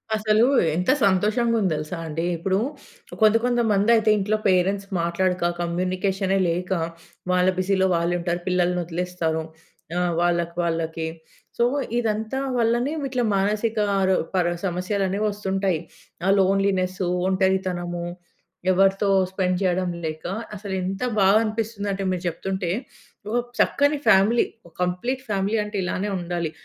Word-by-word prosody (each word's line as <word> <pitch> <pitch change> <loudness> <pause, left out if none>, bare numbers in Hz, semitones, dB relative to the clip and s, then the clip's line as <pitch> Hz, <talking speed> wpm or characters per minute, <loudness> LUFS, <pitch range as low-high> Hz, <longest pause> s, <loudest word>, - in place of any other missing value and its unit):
అసలు 215 +1 +3 0.3
ఎంత 180 +8 +2
సంతోషంగా 215 +5 +2
ఉంది 185 -4 +1
తెలుసా 155 +3 -4
అండి. 160 +2 -2
ఇప్పుడు 190 +3 0 0.6
కొంత 215 0 +6
కొంతమంది 230 -4 +2
అయితే, 220 -1 +2
ఇంట్లో 210 +2 0
పేరెంట్స్ 195 +2 +1
మాట్లాడక, 175 +1 0
కమ్యూనికేషనే 185 +3 0
లేక, 180 +3 -2 0.6
వాళ్ళ 180 0 +3
బిజీలో 190 0 +2
వాళ్ళు 170 +1 0
ఉంటారు, 175 0 -1
పిల్లల్ని 180 -1 +1
వదిలేస్తారు, 170 -1 -2 0.5
ఆహ్, 180 -1 +1
వాళ్ళకి 170 -1 0
వాళ్ళకి. 165 -1 -2 0.5
సో, - - +3 0.4
ఇదంతా 220 +2 -1 0.2
వల్లనే 240 +4 +1
విట్‌లా 255 -3 -1
మానసిక 210 +3 0 0.3
రో 190 - +4 0.2
ప‌ర 180 - +3 0.2
సమస్యలు 185 +2 -1
అనేవి 200 +3 -1
వస్తుంటాయి. 195 -3 -1 0.5
ఆ - - +3
లోన్‌లినెస్సు, 190 -1 +1 0.2
ఒంటరితనము, 185 -2 0 0.7
ఎవరితో 195 +2 +3 0.2
స్పెండ్ 185 -1 0
చేయడం 185 -1 +1 0.2
లేక, 155 0 -5 0.3
అసలు 200 -1 -6
ఎంత 190 +1 -3 0.2
బాగా 195 +3 +6
అనిపిస్తుంది 215 -1 -3
అంటే, 195 0 -3
మీరు 180 0 -3
చెప్తుంటే, 180 +1 -2 0.6
ఓ - - -3 0.3
చక్కని 285 +1 +3
ఫ్యామిలీ, 210 +5 +5 0.2
ఓ - - -15
కంప్లీట్ 240 +9 -2
ఫ్యామిలీ, 200 +2 0
అంటే 210 0 -8
ఇలానే 185 +3 -2
ఉండాలి. 170 -2 -3
190 Hz, 130 wpm, -23 LUFS, 175-210 Hz, 0.7 s, కొంత